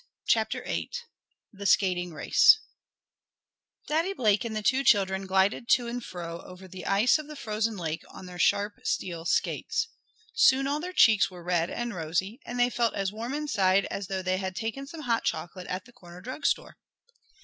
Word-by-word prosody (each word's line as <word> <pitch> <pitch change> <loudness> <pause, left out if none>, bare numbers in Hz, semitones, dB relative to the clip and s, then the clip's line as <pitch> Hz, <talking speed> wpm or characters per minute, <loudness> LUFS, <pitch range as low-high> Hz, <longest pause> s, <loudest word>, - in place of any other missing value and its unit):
CHAPTER - - +1
VIII - - -3 0.6
THE 200 0 -4
SKATING 180 -3 +2
RACE 440 - +5 1.3
Daddy 330 +6 0
Blake 215 - +2
and 225 -2 -4
the 215 - -3
two 265 +5 +2
children 195 -4 +3
glided 190 +5 +1
to 245 - +2
and 240 0 -4
fro 170 -3 -6
over 185 +1 -12
the 185 0 -8
ice 215 +9 +4
of 305 - -8
the 300 - -9
frozen 220 -4 -2
lake 160 -3 -3
on - - -11
their 180 -1 -10
sharp 205 +4 +1
steel 170 -3 -2
skates. 455 - 0 0.4
Soon 270 - +5
all 285 +2 0
their 360 +3 -5
cheeks 215 - +5
were 180 -2 -11
red 175 -1 0
and 240 -1 -3
rosy, 180 - -2
and 245 +1 -4
they 245 0 +3
felt 235 -1 0
as 195 0 -2
warm 235 +5 -4
inside 200 -10 +2
as 200 -2 -4
though 190 -1 -3
they 185 0 0
had 190 -1 -4
taken 235 +5 -4
some 315 +2 -8
hot 235 -5 0
chocolate 180 +1 -3
at 185 +1 -4
the 245 - -18
corner 175 -7 -13
drug 255 +9 -3
store. - - -1
205 Hz, 185 wpm, -28 LUFS, 185-245 Hz, 1.3 s, RACE